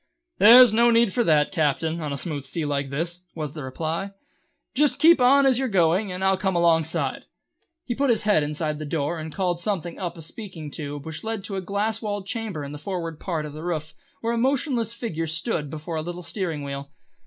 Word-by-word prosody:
"There's 235 +2 +9
no 235 +2 +5
need 230 -4 +3
for 240 - +2
that, 150 -2 +3
Captain, 160 0 0
on 150 -2 -3
a 140 - -3
smooth 145 -1 -2
sea 150 +4 -3
like 140 -1 -1
this," 170 +5 -3
was 150 -3 -4
the 155 - -7
reply. 160 +8 -3 0.6
"Just 295 +2 +3
keep 330 -3 +6
on 275 +3 +6
as 260 -2 +4
you 265 - 0
are - - 0
going 185 0 +2
and 180 +1 -4
I'll 190 0 +3
come 190 -1 0
alongside." 165 -2 +1 0.6
He 240 - -2
put 275 +3 0
his 235 - +3
head 210 -6 +4
inside 150 +1 -2
the 155 - -5
door 150 +2 -2
and 155 0 -6
called 180 -1 -1
something 175 -3 -3
up 175 -2 -4
a 165 - -6
speaking 165 -5 -8
tube 145 -1 -5
which 160 0 -6
led 220 -2 -3
to 200 - -4
a 190 - -2
glass 205 +4 -1
walled 205 -3 -3
chamber 205 -8 -3
in 140 - -7
the 150 - -7
forward 165 -2 -4
part 165 -5 -3
of 150 - -8
the 155 - -8
roof, 155 -3 -3 0.3
where 230 +1 -1
a 235 - 0
motionless 255 -3 +1
figure 170 -9 -4
stood 160 -1 -2
before 155 +2 -5
a - - -1
little 175 +2 -6
steering 165 -7 -3
wheel. 140 0 -6
170 Hz, 220 wpm, -24 LUFS, 155-215 Hz, 0.6 s, There's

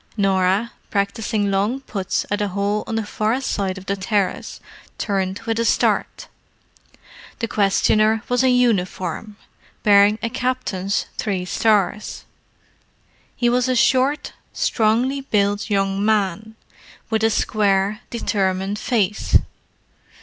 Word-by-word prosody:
Norah, 195 +2 +2 0.2
practising 205 0 -1
long 205 +7 0
putts 195 -8 -2
at 205 0 0
a 205 - +1
hole 200 +2 -1
on 225 - -3
the 225 -1 -1
far 215 +4 -1
side 200 -7 -2
of 190 - -10
the 200 - -1
terrace, 200 0 -2 0.4
turned 195 -2 -1
with 225 0 -2
a - - +2
start. - - 0 1.1
The 230 - -2
questioner 215 +2 +2
was 245 +1 +1
in 255 -1 +4
uniform, 205 -3 0 0.5
bearing 205 0 +5
a 230 - 0
captain's 250 -6 -1
three 190 -4 -1
stars. 210 +1 0 1.1
He 240 - +1
was 250 +1 +2
a 255 - +2
short, 265 +4 +2 0.2
strongly 240 +5 +1
built 205 -4 0
young 195 -1 0
man, 215 0 0 0.6
with 220 0 +1
a 225 - +4
square, 205 -1 +1
determined 195 -3 -1
face. 210 -4 +2
210 Hz, 120 wpm, -21 LUFS, 195-230 Hz, 1.1 s, bearing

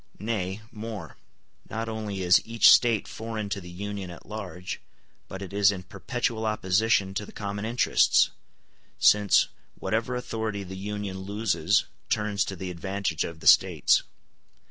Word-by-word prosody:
Nay, 100 -2 -3
more; 105 -6 -7 0.5
not 115 +1 -3
only 105 -4 -4
is 90 0 +6
each 115 0 +6
State 115 -4 +4
foreign 110 -2 -5
to 100 -1 -3
the 90 - -10
Union 100 +1 -5
at 85 - -11
large, 95 -4 -6 0.5
but 95 +1 -7
it 95 - -9
is 100 -1 +5
in 95 -2 -6
perpetual 115 +3 -2
opposition 100 -1 +1
to 100 - -2
the - - -11
common 100 0 -4
interests, 120 +2 +3 0.7
since 105 -1 +5 0.3
whatever 115 +5 -1
authority 110 -4 -3
the 95 0 -8
Union 100 -1 -4
loses 100 -2 +1 0.3
turns 105 -2 +1
to 95 - -5
the 95 0 -5
advantage 95 -1 -2
of 80 -1 -7
the - - -3
States. - - +5
100 Hz, 145 wpm, -27 LUFS, 95-110 Hz, 0.7 s, is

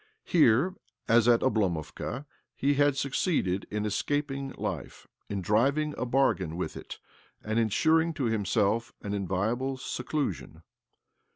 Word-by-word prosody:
'Here, 150 +2 +4 0.3
as 115 0 +4
at 120 -1 +5
Oblomovka, 100 - -1 0.3
he 140 +2 +2
had 145 -1 +3
succeeded 135 - 0
in 105 0 -2
escaping 140 +5 -1
life, - - -5 0.2
in 100 -2 -3
driving 140 +10 +2
a 125 - -3
bargain 95 - +1
with 90 - -3
it, - - -8 0.5
and 110 +2 0
ensuring 160 +9 +3
to 140 - -2
himself 110 0 +1
an 100 -1 -3
inviolable 105 +8 -1
seclusion. 130 - -4
120 Hz, 120 wpm, -28 LUFS, 105-140 Hz, 0.5 s, at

